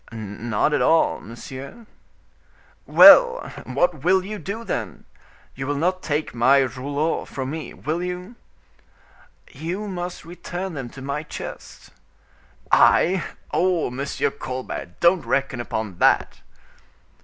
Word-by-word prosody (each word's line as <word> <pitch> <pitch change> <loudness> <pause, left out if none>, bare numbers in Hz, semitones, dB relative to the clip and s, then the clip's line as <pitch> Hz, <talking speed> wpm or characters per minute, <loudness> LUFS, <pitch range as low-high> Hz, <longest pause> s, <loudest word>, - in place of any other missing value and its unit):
"Not 110 +4 -2
at - - +1
all, 165 - +3
monsieur." 135 - -10 1.0
"Well! - - +7
what 175 -6 0
will 185 +2 +3
you 210 +1 -6
do, 200 +7 -5
then? 110 - -5 0.5
You 135 0 -6
will 145 - -1
not 185 +4 0
take 150 0 -2
my 125 +4 +4
rouleaux 140 +5 -2
from 135 0 -5
me, 160 0 -6
will 160 +3 -3
you?" 180 +5 -5 1.2
"You 185 +6 -5
must 180 -3 -6
return 175 +2 -6
them 135 -5 -6
to 135 +2 -11
my 140 +2 -3
chest." 155 - -9 0.8
"I! 185 +1 +4 0.3
Oh! 180 -7 +1
Monsieur 135 +3 -2
Colbert, 130 -8 -6
don't 170 +1 +4
reckon 135 -3 -1
upon 110 -6 -5
that." - - +2
155 Hz, 120 wpm, -23 LUFS, 130-180 Hz, 1.2 s, Well